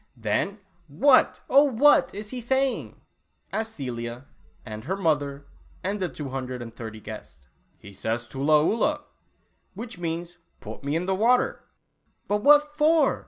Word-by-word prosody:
"Then 115 - -1 0.3
what, 255 - +4
oh 280 +2 +6
what, 275 +1 +4
is 210 +1 -6
he 255 -1 -5
saying?" 265 +2 -1 0.5
asked 220 0 -3
Celia, 120 -1 -5 0.4
and 110 -1 -8
her 190 +6 -2
mother, 145 -5 -1 0.4
and 200 +3 -2
the 185 -2 -1
two 145 -4 -7
hundred 130 -1 -4
and 115 -1 -9
thirty 110 -2 -8
guests. 70 - -11 0.2
" - - -40
He 100 - -11
says 115 +4 -3
'tula 145 +6 +2
oolah,' 295 - +1 0.7
which 225 -1 -8
means 170 +1 -4 0.2
'//// - - -9
me 140 +2 -1
in 170 +2 -1
the 190 - 0
water' 235 +6 +2 0.3
" - - -45
But 205 0 0
what 295 +2 +5
for 310 +1 +3
175 Hz, 160 wpm, -25 LUFS, -, 0.7 s, oh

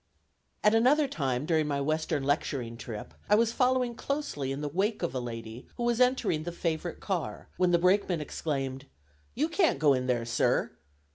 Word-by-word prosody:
At 210 - +5
another 270 +6 +4
time 135 - -1
during 155 -2 +2
my 140 -1 -1
western 155 0 -1
lecturing 135 -4 -1
trip, 115 -2 -7 0.2
I 210 - +6
was 225 +1 +3
following 250 0 +2
closely 240 - -3
in 135 +2 -4
the 150 - -2
wake 195 +8 -1
of - - -1
a 130 - -1
lady 115 0 -7
who 240 - -4
was 240 0 +1
entering 250 -11 +2
the 175 +2 -4
favorite 165 0 -3
car, 185 -5 -3
when 180 0 +3
the 175 - +4
brakeman 180 0 +2
exclaimed; 135 -3 -3 0.5
"You 295 +5 +1
can't 330 - +2
go 145 0 +4
in 130 -1 -1
there, 120 -2 0
sir!" 115 - +1
160 Hz, 185 wpm, -29 LUFS, 135-225 Hz, 0.5 s, I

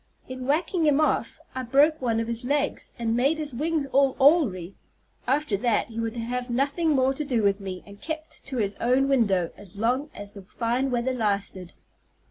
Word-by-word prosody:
In 255 0 -6
whacking 320 +3 +1
him 295 -1 +4
off 310 - 0
I 260 - -3
broke 280 +5 +3
one 230 -3 +1
of 230 - -2
his 235 0 -1
legs, 285 +2 -1
and 230 -2 -1
made 275 +6 +2
his 300 -3 -4
wings 305 +3 -1
all 275 -1 +3
awry. 255 - +3 0.5
After 275 -4 +1
that 230 +1 +1
he 230 0 -6
would 230 +1 -3
have 245 +2 -3
nothing 280 +7 0
more 265 0 +3
to 300 - -3
do 250 -6 0
with 200 0 +2
me, 185 -2 -6
but 200 0 -14
kept 315 0 -6
to 265 -1 -4
his 205 -3 0
own 255 +3 +2
window 200 -10 +2
as 200 0 -11
long 250 +7 0
as 205 0 -8
the 200 - -9
fine 235 +7 -1
weather 250 +1 0
lasted. 200 -6 -2
250 Hz, 195 wpm, -26 LUFS, 220-280 Hz, 0.5 s, him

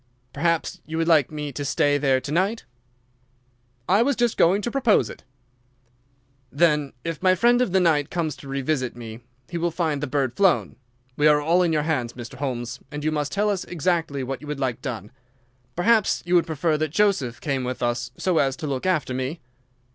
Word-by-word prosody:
"Perhaps 170 +1 -1
you 160 +1 -4
would 165 0 0
like 155 -6 +4
me 150 -1 -4
to 145 +2 -5
stay 145 +1 +2
there 135 -2 +2
to 140 - -7
night?" 195 +8 0 1.2
"I 195 +4 +4
was 275 +3 +2
just 240 -2 +1
going 195 +5 +3
to 240 - -2
propose 250 -5 +2
it." - - -13 1.3
"Then, 150 -1 +2
if 165 -2 -4
my 185 0 +4
friend 240 +5 +4
of 250 - +1
the 190 - +3
night 155 -5 +2
comes 160 -4 -2
to 140 - -12
revisit 135 -2 -2
me, 115 -2 -8 0.3
he 170 - -4
will 170 +1 +1
find 160 -4 -1
the 150 - -2
bird 130 -2 0
flown. 195 -3 +2 0.4
We 150 - +4
are 150 -1 +5
all 165 +5 +2
in 175 -2 +2
your 150 -2 +1
hands, 130 -7 -1
Mr. 120 +1 -9
Holmes, 125 -3 -4
and 145 0 -6
you 155 - +1
must 150 -1 -2
tell 210 +1 +1
us 195 -3 -2
exactly 165 -4 -1
what 135 0 -5
you 150 - -10
would 150 -1 -4
like 125 -2 -2
done. 115 -6 -5 0.6
Perhaps 215 +4 +2
you 175 - -1
would 175 -2 +4
prefer 155 0 0
that 155 0 0
Joseph 155 - +1
came 135 -4 -2
with 125 0 -4
us 120 +1 -1
so 180 -3 +1
as 135 -2 +1
to - - -6
look 140 +3 -2
after 155 -8 0
me?" 130 +6 -3
150 Hz, 205 wpm, -24 LUFS, 135-175 Hz, 1.3 s, are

